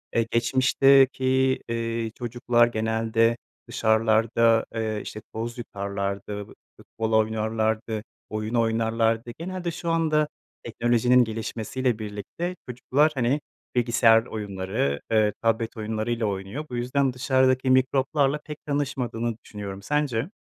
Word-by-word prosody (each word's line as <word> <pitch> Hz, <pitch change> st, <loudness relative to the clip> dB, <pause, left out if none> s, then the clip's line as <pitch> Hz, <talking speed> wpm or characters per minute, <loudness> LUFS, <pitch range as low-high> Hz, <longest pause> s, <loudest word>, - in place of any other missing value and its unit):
eee, 115 Hz, -1 st, +2 dB
geçmişteki, 130 Hz, +1 st, +3 dB
eee, 115 Hz, -1 st, -2 dB
çocuklar 120 Hz, 0 st, +2 dB
genelde 115 Hz, 0 st, +1 dB, 0.3 s
dışarılarda, 115 Hz, +1 st, +3 dB
eee, 110 Hz, -1 st, -1 dB
işte, 110 Hz, -, -7 dB
toz 115 Hz, +2 st, -4 dB
yutarlardı, 100 Hz, -1 st, -4 dB
f -, -, -17 dB, 0.3 s
futbol 110 Hz, 0 st, -4 dB
oynarlardı, 110 Hz, 0 st, -1 dB, 0.3 s
oyun 110 Hz, +1 st, -4 dB
oynarlardı. 115 Hz, 0 st, +1 dB
Genelde 175 Hz, +1 st, -4 dB
şu 170 Hz, 0 st, -4 dB
anda 155 Hz, -2 st, +2 dB, 0.4 s
teknolojinin 120 Hz, +1 st, +3 dB
gelişmesiyle 115 Hz, +2 st, -2 dB
birlikte 110 Hz, -, -5 dB
çocuklar, 130 Hz, +5 st, +1 dB
hani, 130 Hz, +3 st, +1 dB, 0.3 s
bilgisayar 115 Hz, -2 st, +4 dB
oyunları, 95 Hz, -, -2 dB
eee, 110 Hz, -2 st, +3 dB
tablet 115 Hz, 0 st, 0 dB
oyunlarıyla 110 Hz, +2 st, -2 dB
oynuyor. 100 Hz, +8 st, -4 dB
Bu 125 Hz, -, -5 dB
yüzden 130 Hz, +2 st, 0 dB
dışarıdaki 130 Hz, 0 st, +2 dB
mikroplarla 135 Hz, +2 st, +2 dB
pek 150 Hz, -1 st, -9 dB
tanışmadığını 125 Hz, -6 st, -2 dB
düşünüyorum, 100 Hz, -2 st, -7 dB
sence? 145 Hz, -, -1 dB
115 Hz, 110 wpm, -25 LUFS, 110-130 Hz, 0.4 s, bilgisayar